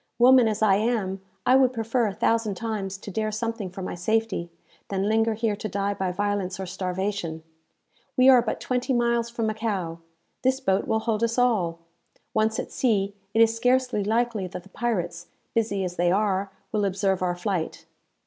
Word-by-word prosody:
Woman 250 Hz, 0 st, +7 dB
as 215 Hz, 0 st, 0 dB
I 195 Hz, -2 st, +5 dB
am, 205 Hz, -4 st, -1 dB, 0.2 s
I 255 Hz, -, +5 dB
would 260 Hz, -1 st, +5 dB
prefer 230 Hz, 0 st, 0 dB
a 200 Hz, -, -3 dB
thousand 225 Hz, -3 st, +1 dB
times 195 Hz, -2 st, -3 dB
to 200 Hz, -, -9 dB
dare 215 Hz, +2 st, -1 dB
something 225 Hz, -2 st, -3 dB
for 190 Hz, +1 st, -7 dB
my -, -, -4 dB
safety, 200 Hz, -1 st, -1 dB, 0.4 s
than 195 Hz, 0 st, -1 dB
linger 225 Hz, +1 st, +2 dB
here 220 Hz, -1 st, 0 dB
to 215 Hz, +1 st, -5 dB
die 200 Hz, +1 st, -1 dB
by 190 Hz, -2 st, -2 dB
violence 200 Hz, -1 st, -2 dB
or 190 Hz, -, -3 dB
starvation! 180 Hz, -2 st, -3 dB, 0.7 s
We 255 Hz, 0 st, +6 dB
are 255 Hz, -2 st, +8 dB
but -, -, -3 dB
twenty 255 Hz, +1 st, -1 dB
miles 235 Hz, -1 st, +1 dB
from 235 Hz, -1 st, -2 dB
Macao. 205 Hz, -7 st, -2 dB, 0.4 s
This 260 Hz, +1 st, +2 dB
boat 195 Hz, -7 st, +1 dB
will 220 Hz, -, +1 dB
hold 220 Hz, -1 st, -1 dB
us 230 Hz, +1 st, 0 dB
all. 190 Hz, -10 st, +1 dB, 0.5 s
Once 220 Hz, 0 st, +1 dB
at -, -, -4 dB
sea, 200 Hz, -5 st, +1 dB, 0.2 s
it 225 Hz, -, +5 dB
is 225 Hz, 0 st, +2 dB
scarcely 250 Hz, -2 st, +2 dB
likely 220 Hz, -2 st, 0 dB
that 180 Hz, -, -8 dB
the 195 Hz, -, -17 dB
pirates, 200 Hz, -7 st, -2 dB, 0.3 s
busy 215 Hz, -4 st, 0 dB
as 180 Hz, -1 st, -4 dB
they 175 Hz, 0 st, +3 dB
are, 195 Hz, 0 st, +1 dB, 0.2 s
will 210 Hz, -1 st, 0 dB
observe 195 Hz, -1 st, 0 dB
our 180 Hz, -1 st, 0 dB
flight. 180 Hz, -3 st, -3 dB
215 Hz, 185 wpm, -25 LUFS, 190-230 Hz, 0.7 s, are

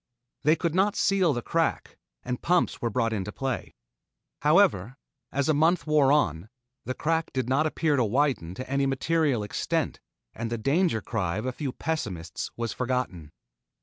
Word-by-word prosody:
They 150 Hz, +3 st, +4 dB
could 170 Hz, -2 st, -1 dB
not 195 Hz, +3 st, +2 dB
seal 190 Hz, -4 st, +3 dB
the 120 Hz, -4 st, -2 dB
crack, 165 Hz, -1 st, -1 dB, 0.3 s
and 125 Hz, 0 st, -4 dB
pumps 180 Hz, 0 st, +1 dB
were 120 Hz, -, 0 dB
brought 115 Hz, 0 st, 0 dB
into 105 Hz, -1 st, -3 dB
play. 135 Hz, -, -4 dB, 0.7 s
However, 105 Hz, +7 st, +3 dB, 0.3 s
as 140 Hz, 0 st, 0 dB
a 155 Hz, -, +4 dB
month 160 Hz, +2 st, +2 dB
wore 150 Hz, -3 st, +4 dB
on, 95 Hz, -, +1 dB, 0.4 s
the 130 Hz, -, -3 dB
crack 165 Hz, 0 st, 0 dB
did 130 Hz, -2 st, -1 dB
not 140 Hz, +5 st, +2 dB
appear 155 Hz, -1 st, +1 dB
to 125 Hz, -, +3 dB
widen 115 Hz, -, 0 dB
to 130 Hz, -, -6 dB
any 140 Hz, +1 st, +1 dB
material 140 Hz, -3 st, +1 dB
extent 105 Hz, -, -2 dB, 0.3 s
and 115 Hz, 0 st, -4 dB
the 120 Hz, -, -1 dB
danger 140 Hz, -, +1 dB
cry 95 Hz, -5 st, -2 dB
of 110 Hz, -, -3 dB
a 130 Hz, -, 0 dB
few 135 Hz, +1 st, -4 dB
pessimists 100 Hz, -, -4 dB
was 115 Hz, -1 st, -2 dB
forgotten. 125 Hz, -, -3 dB
130 Hz, 170 wpm, -27 LUFS, 115-155 Hz, 0.7 s, They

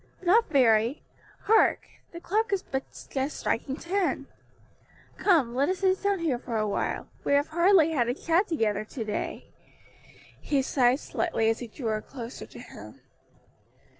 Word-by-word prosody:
"Not 420 Hz, +6 st, +4 dB
very. 235 Hz, -3 st, +3 dB, 0.4 s
Hark! 445 Hz, +1 st, +4 dB, 0.3 s
the 340 Hz, -, -8 dB
clock 430 Hz, +6 st, -1 dB
is 395 Hz, -2 st, 0 dB
but 265 Hz, 0 st, -3 dB, 0.3 s
just 270 Hz, +2 st, -2 dB
striking 265 Hz, +3 st, -2 dB
ten. 365 Hz, +4 st, -1 dB, 0.9 s
Come, 310 Hz, -, +3 dB
let 275 Hz, +5 st, +1 dB
us 375 Hz, -, 0 dB
sit 375 Hz, 0 st, +1 dB
down 400 Hz, -1 st, +1 dB
here 315 Hz, -8 st, -1 dB
for 240 Hz, -3 st, -4 dB
a 215 Hz, -, +1 dB
little. 205 Hz, -, -2 dB, 0.2 s
We -, -, +1 dB
have 285 Hz, +1 st, +2 dB
hardly 340 Hz, 0 st, +4 dB
had 250 Hz, -7 st, +1 dB
a 245 Hz, -, -1 dB
chat 335 Hz, +6 st, +1 dB
together 215 Hz, -, 0 dB
to 225 Hz, +2 st, -6 dB
day." 210 Hz, -1 st, -5 dB, 0.9 s
He 280 Hz, -2 st, 0 dB
sighed 260 Hz, 0 st, +2 dB
slightly 225 Hz, -10 st, 0 dB
as 225 Hz, -, -3 dB
he 245 Hz, -, -6 dB
drew 230 Hz, +1 st, -5 dB
her 215 Hz, 0 st, -1 dB
closer 240 Hz, -1 st, -9 dB
to -, -, -13 dB
him. -, -, -12 dB
280 Hz, 165 wpm, -27 LUFS, 235-350 Hz, 0.9 s, Not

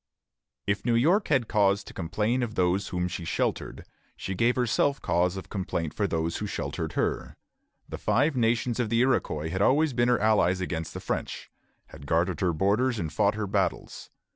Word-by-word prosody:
If 100 Hz, 0 st, -1 dB
New 120 Hz, -1 st, +2 dB
York 170 Hz, -, +3 dB
had 130 Hz, -6 st, +2 dB
cause 100 Hz, -2 st, +2 dB
to -, -, -12 dB
complain 105 Hz, +8 st, -1 dB
of 115 Hz, -3 st, -3 dB
those 90 Hz, +2 st, +1 dB
whom 90 Hz, -1 st, -2 dB
she 90 Hz, -, -5 dB
sheltered, -, -, -2 dB, 0.3 s
she 95 Hz, -, -4 dB
herself 125 Hz, +5 st, +2 dB
gave -, -, -35 dB
cause 90 Hz, +2 st, +1 dB
of 95 Hz, -, -8 dB
complaint 90 Hz, -5 st, -3 dB
to 100 Hz, -, +1 dB
those 80 Hz, -1 st, -1 dB
who -, -, -4 dB
sheltered -, -, -4 dB
her. -, -, -2 dB, 0.5 s
The -, -, -7 dB
Five 135 Hz, +8 st, +2 dB
Nations 115 Hz, 0 st, +1 dB
of 120 Hz, -3 st, 0 dB
the 115 Hz, +1 st, +2 dB
Iroquois 80 Hz, -, 0 dB
had 95 Hz, -, -2 dB
always 145 Hz, +6 st, +3 dB
been 120 Hz, 0 st, +2 dB
her 125 Hz, -, +3 dB
allies 105 Hz, -4 st, +3 dB
against 85 Hz, -3 st, -4 dB
the -, -, -5 dB
French, -, -, -4 dB, 0.4 s
had 70 Hz, -2 st, -12 dB
guarded 85 Hz, +4 st, +1 dB
her 90 Hz, -3 st, +2 dB
borders 105 Hz, +9 st, +1 dB
and 80 Hz, -5 st, -4 dB
fought 100 Hz, +7 st, +2 dB
her 110 Hz, -1 st, -2 dB
battles. 95 Hz, -, -2 dB
105 Hz, 190 wpm, -27 LUFS, 90-120 Hz, 0.5 s, York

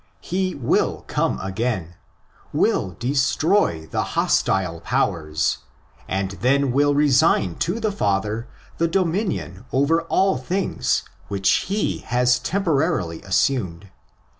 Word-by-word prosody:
He 185 Hz, +1 st, -2 dB
will 130 Hz, -4 st, 0 dB
come -, -, -1 dB
again; 95 Hz, -3 st, -2 dB, 0.6 s
will 90 Hz, -2 st, +1 dB
destroy 135 Hz, -, +1 dB
the -, -, -2 dB, 0.2 s
hostile 90 Hz, -3 st, +1 dB
powers; 75 Hz, -1 st, 0 dB, 0.5 s
and 95 Hz, 0 st, -2 dB
then 135 Hz, +1 st, +2 dB
will 145 Hz, +2 st, +3 dB
resign 135 Hz, -, +3 dB
to 180 Hz, +8 st, -1 dB
the 220 Hz, -2 st, 0 dB
Father 105 Hz, -, -1 dB, 0.3 s
the 170 Hz, -, +3 dB
dominion 165 Hz, -, -1 dB
over 145 Hz, +5 st, +2 dB
all 190 Hz, +2 st, +1 dB
things 130 Hz, -, -1 dB, 0.2 s
which 95 Hz, -1 st, +1 dB, 0.2 s
he 205 Hz, +1 st, 0 dB
has 125 Hz, +1 st, +2 dB
temporarily 155 Hz, -, 0 dB
assumed. 95 Hz, -3 st, 0 dB
125 Hz, 110 wpm, -22 LUFS, -, 0.6 s, will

